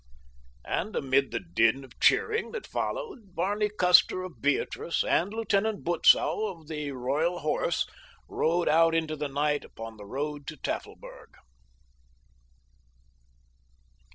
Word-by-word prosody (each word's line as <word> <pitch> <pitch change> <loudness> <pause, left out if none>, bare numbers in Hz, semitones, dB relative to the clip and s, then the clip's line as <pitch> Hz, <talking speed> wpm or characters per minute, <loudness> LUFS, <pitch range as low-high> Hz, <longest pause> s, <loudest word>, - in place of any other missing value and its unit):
And 215 - -2
amid 135 0 +2
the - - -2
din 115 +10 +1
of 130 -1 -16
cheering 450 +2 +2
that 465 - -5
followed, 275 - -5
Barney 205 +5 0
Custer 185 -1 +4
of 170 -12 -10
Beatrice 145 +3 0
and 185 +4 +1
Lieutenant 220 -1 0
Butzow 190 +4 +3
of 165 -6 -9
the 150 -2 -4
Royal 145 +8 -1
Horse 155 -2 0 0.4
rode 170 +2 0
out 165 +1 +4
into 160 -1 0
the 150 -1 -3
night 145 +1 0
upon 115 0 -10
the 105 - -10
road 145 +4 -4
to 155 - -6
Tafelberg. - - -7
160 Hz, 125 wpm, -28 LUFS, 140-195 Hz, 0.4 s, Custer